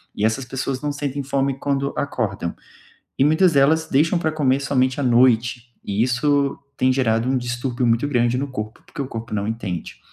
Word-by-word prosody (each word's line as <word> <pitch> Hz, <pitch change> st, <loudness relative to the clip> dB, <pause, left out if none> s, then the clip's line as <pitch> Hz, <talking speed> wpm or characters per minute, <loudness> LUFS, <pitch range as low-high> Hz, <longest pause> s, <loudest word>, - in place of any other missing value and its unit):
e 105 Hz, -, -3 dB
essas 115 Hz, +4 st, 0 dB
pessoas 135 Hz, +1 st, -3 dB
não 150 Hz, -, -1 dB
sentem 145 Hz, -1 st, -3 dB
fome 135 Hz, 0 st, -1 dB
quando 140 Hz, 0 st, -1 dB
acordam 100 Hz, -10 st, -2 dB, 0.6 s
e 135 Hz, -, +4 dB
muitas 160 Hz, +2 st, +4 dB
delas 155 Hz, +4 st, +3 dB
deixam 165 Hz, +6 st, +2 dB
para 160 Hz, -2 st, 0 dB
comer 140 Hz, -3 st, +1 dB
somente 130 Hz, -1 st, +1 dB
à -, -, -1 dB
noite, 120 Hz, -1 st, +2 dB
e 100 Hz, +2 st, -1 dB
isso 140 Hz, +3 st, +1 dB, 0.2 s
tem 130 Hz, 0 st, +3 dB
gerado 115 Hz, -3 st, +1 dB
um 130 Hz, 0 st, +2 dB
distúrbio 120 Hz, 0 st, -2 dB
muito 115 Hz, +4 st, +2 dB
grande 120 Hz, -3 st, +1 dB
no 140 Hz, -, -1 dB
corpo, 110 Hz, -3 st, -6 dB
porque -, -, -9 dB
o 135 Hz, -, -3 dB
corpo 115 Hz, -3 st, -7 dB
não 100 Hz, 0 st, -1 dB
entende. 95 Hz, -7 st, -5 dB
130 Hz, 190 wpm, -22 LUFS, 120-140 Hz, 0.6 s, e